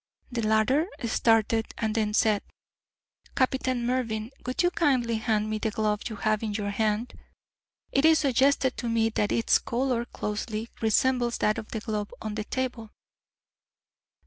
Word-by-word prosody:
The 240 -1 -2
latter 220 +9 +2 0.2
started, 225 -1 +2
and 220 -1 -1
then 210 -2 0
said, 215 -3 +3 0.9
"Captain 255 -2 0
Mervyn, 235 -3 -1
would 255 +7 -1
you 350 - +3
kindly 255 -9 +1
hand 215 -1 0
me 215 0 -2
the 220 - 0
glove 210 0 -1
you 220 - -6
have 215 +1 0
in 215 -2 -3
your 205 -1 -2
hand. 215 +3 -1 0.8
It 275 - +2
is 320 0 +7
suggested 270 -1 +2
to 240 - -3
me 225 -1 +2
that 210 -2 0
its 230 - +3
colour 240 -1 -1
closely 215 0 -4
resembles 240 +2 +2
that 215 - +1
of 215 - -8
the 220 - -4
glove 210 -2 -3
on 215 -1 -5
the 215 0 -4
table." 250 -4 -3
225 Hz, 155 wpm, -27 LUFS, 215-255 Hz, 0.9 s, is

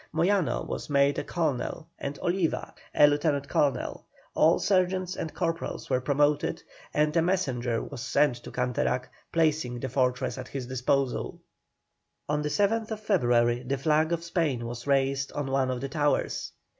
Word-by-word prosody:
Moyano 175 +1 +1
was - - -5
made 140 0 +3
a - - -3
colonel 155 -1 -2
and 140 +1 -4
Oliva 175 -2 0 0.2
a - - +8
lieutenant 145 -1 +1
colonel, 140 -4 0 0.3
all 160 +2 +4
sergeants 185 -1 +1
and 160 - -4
corporals 165 -5 -3
were 130 0 +2
promoted, 145 +2 +1 0.3
and 150 0 +1
a 165 - +5
messenger 130 -10 0
was 140 -5 -7
sent 135 0 +2
to 120 - -10
Canterac 125 0 -1 0.2
placing 155 -7 +1
the 130 - -3
fortress 125 0 0
at 130 - -6
his 135 -3 -5
disposal. 130 +1 -1 0.9
On 150 0 0
the 150 - -1
7th 220 +5 +1
February 120 - +2
the 130 +2 -2
flag 155 +3 +2
of 170 -1 -1
Spain 160 -8 -1
was 120 +2 -6
raised 140 0 +1
on 145 -2 -3
one 135 -1 +2
of 125 -1 -2
the 135 - -3
towers. 145 +1 0
140 Hz, 155 wpm, -28 LUFS, 130-165 Hz, 0.9 s, a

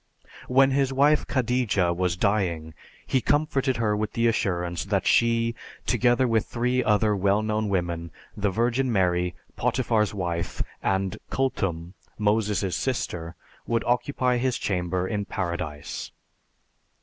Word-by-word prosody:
When 135 +1 +4
his 135 0 +2
wife 145 +3 +3
Khadija 120 -9 +1
was 90 -1 0
dying 90 -6 0 0.3
he 130 - +1
comforted 140 -4 +1
her 110 -2 +1
with 105 0 -2
the 115 - +1
assurance 90 -6 0
that 100 -1 0
she, 115 +1 +3 0.3
together 125 +1 +3
with 115 -2 +1
three 125 +1 0
other 105 -2 +3
well 100 +2 +2
known 110 0 -1
women, 85 -3 -1 0.3
the 100 0 0
Virgin 120 +5 +1
Mary, 90 -3 +1 0.2
Potiphar's 115 -5 +1
wife, 85 -4 -3 0.2
and 95 -1 -1
"Kulthum," 95 -10 -1 0.2
Moses' 105 -3 +1
sister, 85 -10 -3 0.3
would 115 -1 +1
occupy 125 +1 +1
his 125 0 0
chamber 90 -1 -1
in 105 -1 -2
Paradise. 85 -7 -4
105 Hz, 125 wpm, -25 LUFS, 90-125 Hz, 0.3 s, When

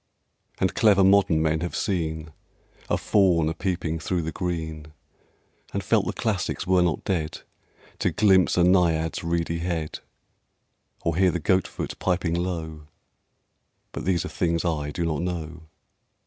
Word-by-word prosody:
And 95 - 0
clever 100 -4 +4
modern 95 -5 +4
men 80 0 +1
have 85 +1 -4
seen 80 -4 -2 0.6
A - - +2
Faun 90 -6 +3
a - - -2
peeping 85 -3 -2
through 90 0 -2
the 80 - -3
green, 80 -4 -4 0.8
And - - -2
felt - - +2
the - - -1
Classics - - -2
were 90 -1 +3
not 85 -4 0
dead, 80 -5 -2 0.6
To - - +2
glimpse 95 -5 +3
a 90 - +5
Naiad's 85 -3 +2
reedy 85 0 -1
head, 85 -3 -3 1.0
Or 85 - 0
hear 95 +1 +4
the 90 - -1
Goat 95 +4 +2
foot - - -6
piping 90 -2 0
low:... 80 -3 -4 1.0
But - - -6
these 90 -2 +1
are - - -5
things 85 0 -1
I 75 -4 -1
do 85 +3 -2
not 80 -2 -1
know. 85 -2 -5
85 Hz, 150 wpm, -25 LUFS, 80-90 Hz, 1.0 s, a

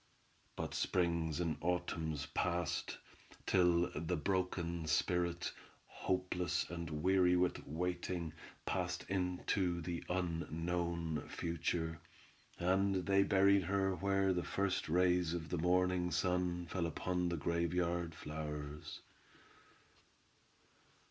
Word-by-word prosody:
But - - -4
springs 85 -3 +1
and 85 -3 0
autumns 80 -3 -1
passed, 85 -1 -1 0.5
till 90 -2 +4
the 80 +2 -1
broken 85 -1 -1
spirit, 85 +2 +1 0.3
hopeless 90 -1 -1
and 85 -2 -4
weary 90 -1 +5
with 90 0 +1
waiting, 85 0 -2 0.3
passed - - -1
into 90 -1 0
the 85 0 -4
unknown 85 -2 -1
future, 85 -1 -2 0.6
and 95 +1 +2
they 100 -1 +4
buried 100 -1 +4
her 95 +1 +1
where 95 +1 +2
the 90 - 0
first 100 -4 -1
rays 90 0 +3
of 80 -2 -5
the 90 - -1
morning 90 +1 +2
sun 90 0 0
fell 85 0 -1
upon 90 +2 -1
the 85 - -1
graveyard 85 +1 0
flowers. 75 -1 -6
90 Hz, 100 wpm, -36 LUFS, 85-90 Hz, 0.6 s, weary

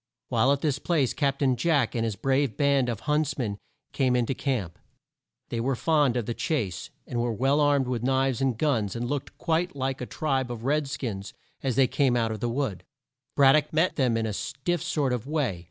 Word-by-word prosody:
While 120 +4 +3
at 140 0 +1
this 145 -3 0
place 150 -7 +1
Cap 140 -2 0
tain 135 -3 +2
Jack, 145 -4 +1
and 115 - -1
his 110 -3 -1
brave 135 -2 0
band 140 -3 +2
of 115 -4 -3
hunts 150 -1 0
men 105 -6 -3 0.3
came 130 -3 +2
in 120 -1 +2
to 135 - -1
camp. 120 - -3 0.7
They 115 - -2
were 130 +3 0
fond 145 -3 +2
of 120 - -1
the 120 - -2
chase, 105 - -2 0.2
and 120 -2 -2
were 120 0 0
well 135 +6 +2
armed 145 -3 +3
with 125 -3 -2
knives 130 0 +1
and 130 -4 +1
guns, 115 -10 0
and 120 +1 -2
looked 140 +1 -4
quite 170 0 0
like 135 -1 -2
a 125 - -4
tribe 135 -5 -1
of 115 -2 -6
red 145 +2 +1
skins 110 -8 -5 0.3
as 130 -3 -1
they 135 - +5
came 130 -1 +2
out 115 -1 +1
of 110 - -4
the 120 - -1
wood. 120 -6 -2 0.5
Brad 135 -1 +6
dock 150 0 +2
met 160 +4 +2
them 125 -5 +2
in 115 - 0
a 110 - -2
stiff 145 - -2
sort 150 -6 0
of 125 +1 -3
way. 140 - -1
135 Hz, 220 wpm, -27 LUFS, 120-145 Hz, 0.7 s, Brad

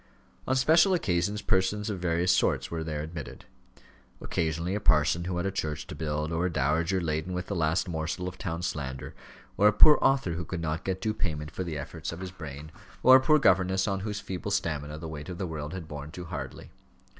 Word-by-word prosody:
On 130 - +2
special 160 +8 +5
occasions 100 - 0
persons 95 +3 +1
of 100 -4 -3
various 85 0 +2
sorts - - +1
were 80 -1 -2
there 75 -2 -3
admitted; 80 -2 -8 0.7
occasionally 85 +3 -1
a 105 - 0
parson 80 -2 +3
who 90 -1 -2
had 90 - -1
a 100 - 0
church 75 -5 -3
to - - -8
build, 75 +1 -2
or 85 +2 +1
a - - -3
dowager 80 +6 +1
laden 80 +1 -2
with 90 0 -3
the 100 - -4
last 80 +2 +1
morsel 85 +2 -3
of 90 0 -7
town 85 -1 -3
slander, 65 -6 -4 0.4
or 105 - +6
a - - +7
poor 150 +7 +8
author 135 -10 +2
who 85 +1 -3
could 85 +2 -5
not 80 -1 -2
get 95 -1 -2
due 110 -1 0
payment 75 -7 -3
for 95 - -4
the 85 -4 -4
efforts 70 - -5
of 85 - -7
his 95 -1 -6
brain, 75 -3 -8 0.3
or 130 0 +9
a - - +1
poor 155 +3 +5
governess 95 -5 +3
on 100 -1 0
whose 105 +1 -3
feeble 100 -1 -5
stamina 75 -6 -2
the 80 +1 -7
weight 75 0 -7
of 90 - -5
the 95 - -2
world 75 -3 -5
had 90 -3 -6
borne 75 -1 -7
too 90 +2 -8
hardly. - - -7
85 Hz, 220 wpm, -28 LUFS, 80-95 Hz, 0.7 s, or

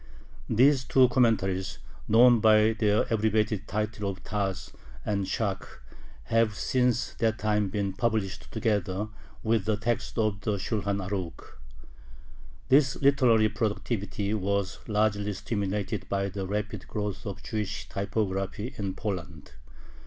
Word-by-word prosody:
These 130 +3 +4
two 130 -1 +5
commentaries, 105 -7 +1 0.3
known 120 +2 +6
by 110 0 +5
their 110 -1 +2
abbreviated 110 -2 +1
titles 105 -2 -2
of 95 - -18
TaZ 100 -3 -3 0.3
and 100 -2 -1
ShaK, 100 -4 -1 0.6
have 115 - +2
since 125 0 +1
that 110 -1 +1
time 105 0 +1
been 100 0 -2
published 100 -2 -2
together 105 -3 -1 0.3
with 110 -3 +1
the 110 -1 +1
text 115 +3 -2
of 105 -3 0
the 105 -1 -1
Shulhan 100 0 -1
Arukh. 95 -4 -5 1.1
This 135 0 +4
literary 125 -6 +4
productivity 105 -1 -2
was 100 -2 -1
largely 105 -1 +1
stimulated 100 -1 -3
by 100 0 0
the 95 0 -4
rapid 105 +2 -3
growth 105 0 -4
of 100 -1 -6
Jewish 105 -2 -4
typography 100 +3 -2
in 95 -2 -3
Poland. 90 -7 -5
105 Hz, 125 wpm, -28 LUFS, 100-110 Hz, 1.1 s, known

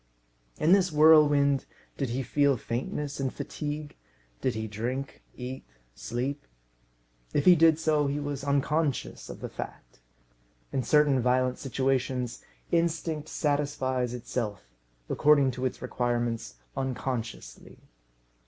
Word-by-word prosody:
In 160 - +2
this 190 -2 +5
whirlwind, 150 -3 +5 0.3
did 135 -3 -2
he 130 +3 -2
feel 140 +1 +2
faintness 135 +6 -4
and 135 -2 -1
fatigue? 150 0 -5 0.5
Did 130 - 0
he 110 0 -3
drink, 120 +6 -4
eat, 130 +1 -6 0.3
sleep? 125 - -4 0.9
If 145 - +2
he 180 - +9
did 160 -1 +5
so, 155 -2 +2
he 140 +1 -1
was 145 -1 -4
unconscious 145 +1 0
of - - -8
the - - -3
fact. - - -9 0.7
In 130 - 0
certain 145 0 +4
violent 125 +1 +1
situations 130 -2 -1 0.3
instinct 165 -2 0
satisfies 135 -4 -1
itself, 110 -4 -4 0.4
according 145 -3 +4
to 130 +1 -4
its 130 - -7
requirements, 120 - -1 0.2
unconsciously. 125 - -4
135 Hz, 115 wpm, -28 LUFS, 125-150 Hz, 0.9 s, he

